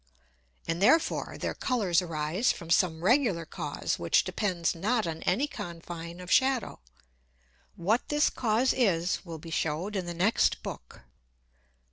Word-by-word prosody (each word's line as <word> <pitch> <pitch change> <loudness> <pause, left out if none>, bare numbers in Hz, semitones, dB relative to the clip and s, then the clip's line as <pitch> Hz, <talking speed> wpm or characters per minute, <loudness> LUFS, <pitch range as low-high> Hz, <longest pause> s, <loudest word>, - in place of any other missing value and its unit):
And 165 +2 -2
therefore 320 +11 +2
their - - -2
Colours 200 -9 +1
arise 165 +6 0
from 165 -1 -8
some 170 -2 +2
regular 215 - +2
Cause - - -3
which - - +3
depends 180 -6 -1
not 215 +7 0
on 160 -1 -4
any 210 +11 +2
Confine 170 - -7
of 180 0 -8
Shadow. 260 -2 +2 1.0
What 210 +8 0
this 295 +1 +2
Cause 235 +2 +1
is 185 -7 +1
will 165 -3 -7
be 165 +1 -10
shewed 165 +7 -2
in 185 -3 -2
the 175 - -4
next 190 +7 +2
Book. - - -8
180 Hz, 140 wpm, -29 LUFS, 165-225 Hz, 1.0 s, which